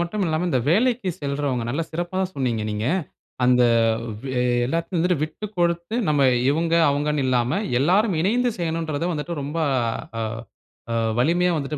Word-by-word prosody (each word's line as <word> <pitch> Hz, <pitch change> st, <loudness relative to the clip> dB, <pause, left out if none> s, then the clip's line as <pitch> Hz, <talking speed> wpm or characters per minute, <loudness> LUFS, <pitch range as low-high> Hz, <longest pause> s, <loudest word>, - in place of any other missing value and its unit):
மட்டும் 185 Hz, +3 st, -1 dB
இல்லாம 160 Hz, +1 st, 0 dB
இந்த 130 Hz, -, +1 dB
வேலைக்கு 235 Hz, +2 st, +2 dB
செல்றவங்க, 140 Hz, -3 st, -1 dB
நல்ல 145 Hz, +7 st, -1 dB
சிறப்பா 175 Hz, +3 st, -3 dB, 0.2 s
சொன்னீங்க 120 Hz, -5 st, -1 dB
நீங்க. 105 Hz, +2 st, -2 dB, 0.6 s
அந்த 125 Hz, 0 st, +5 dB, 0.6 s
வெ 135 Hz, -, -5 dB, 0.4 s
எல்லாத்தையும் 165 Hz, +6 st, -2 dB
வந்துட்டு 180 Hz, 0 st, +2 dB
விட்டுக் 205 Hz, +7 st, -6 dB
கொடுத்து 170 Hz, +3 st, 0 dB
நம்ம 150 Hz, -2 st, +2 dB, 0.3 s
இவங்க 165 Hz, +3 st, 0 dB, 0.2 s
அவங்கன்னு 145 Hz, 0 st, 0 dB
இல்லாம 125 Hz, +4 st, +1 dB, 0.2 s
எல்லோரும் 190 Hz, -, +3 dB
இணைந்து 240 Hz, +7 st, +2 dB
செய்யணும்ன்றத 165 Hz, -2 st, -2 dB
வந்துட்டு 160 Hz, +2 st, -3 dB
ரொம்ப 145 Hz, +4 st, -4 dB, 0.6 s
அ -, -, -1 dB, 0.7 s
அ -, -, 0 dB, 0.3 s
வலிமையா 175 Hz, +7 st, +3 dB
வந்துட்டு 150 Hz, +1 st, -3 dB
160 Hz, 145 wpm, -23 LUFS, 140-175 Hz, 0.7 s, அந்த